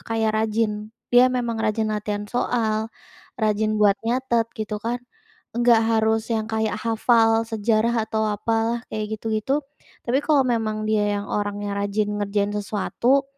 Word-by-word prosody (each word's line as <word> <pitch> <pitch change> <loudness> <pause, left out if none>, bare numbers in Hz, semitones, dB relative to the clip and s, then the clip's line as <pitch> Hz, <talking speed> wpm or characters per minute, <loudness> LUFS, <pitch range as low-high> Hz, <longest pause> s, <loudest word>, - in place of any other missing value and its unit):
kayak 220 -1 +2
rajin, 215 -1 -1 0.2
dia 245 +1 +7
memang 240 -2 -1
rajin 215 0 0
latihan 210 0 -3
soal, 220 -2 0 0.5
rajin 215 0 +1
buat 205 -1 +5
nyatet 235 -1 +1
gitu 215 0 -3
kan. 240 +2 -1 0.6
Enggak 240 -1 +5
harus 220 0 +2
yang 220 -1 0
kayak 220 0 -1
hafal 225 0 +3
sejarah 225 +1 +1
atau 220 0 0
apalah 225 +2 0
kayak 215 0 -3
gitu-gitu. 225 +7 -1 0.4
Tapi 255 +3 +3
kalau 290 -4 +4
memang 220 -3 -1
dia 215 -1 +2 0.2
yang 200 - -6
orangnya 205 0 -2
rajin 205 +1 -1
ngerjain 205 0 0
sesuatu, 220 +6 +1
220 Hz, 140 wpm, -23 LUFS, 210-230 Hz, 0.6 s, dia